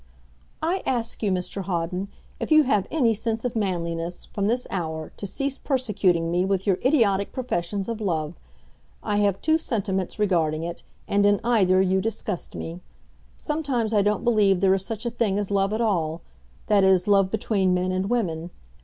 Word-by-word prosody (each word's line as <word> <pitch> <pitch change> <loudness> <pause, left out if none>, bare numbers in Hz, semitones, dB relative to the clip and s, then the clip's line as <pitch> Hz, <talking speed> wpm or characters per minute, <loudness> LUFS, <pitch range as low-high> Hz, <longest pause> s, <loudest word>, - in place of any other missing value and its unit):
"I 355 +4 0
ask 235 -3 -2
you, 210 - +1
Mr 185 +2 -2
Hawden, 180 +1 -2 0.3
if - - -3
you 310 -1 +7
have 210 -8 +1
any 255 -8 +2
sense 225 +2 -3
of 245 - -2
manliness, 175 -4 -2
from 200 -1 -2
this 245 +3 0
hour 160 -4 -4
to 200 - -5
cease 275 +7 -3
persecuting 200 - +1
me 175 +1 +2
with 190 0 0
your 195 -3 +2
idiotic 215 -8 +2
professions 200 -6 -2
of 230 -1 -4
love. 160 -5 -1 0.7
I 205 - 0
have 200 -2 +1
two 315 +1 +3
sentiments 195 - -2
regarding 165 -6 +1
it, 170 0 -5 0.3
and 200 0 +2
in 205 0 +4
either 190 -6 +4
you 190 0 +2
disgust 210 -3 -4
me. 170 +2 -6 0.6
Sometimes 275 -8 -1
I 210 - +4
don't 210 0 +1
believe 210 -5 +3
there 190 0 +4
is 190 -1 0
such 225 +3 -5
a 235 - -1
thing 220 -4 0
as 205 -1 -2
love 195 0 +2
at 215 +2 -1
all 170 -7 0 0.4
that 205 -2 +3
is, 190 -1 +4
love 195 -2 +4
between 200 -4 +1
men 180 +1 0
and 185 +2 -1
women. 175 -9 -1
200 Hz, 180 wpm, -24 LUFS, 180-225 Hz, 0.7 s, you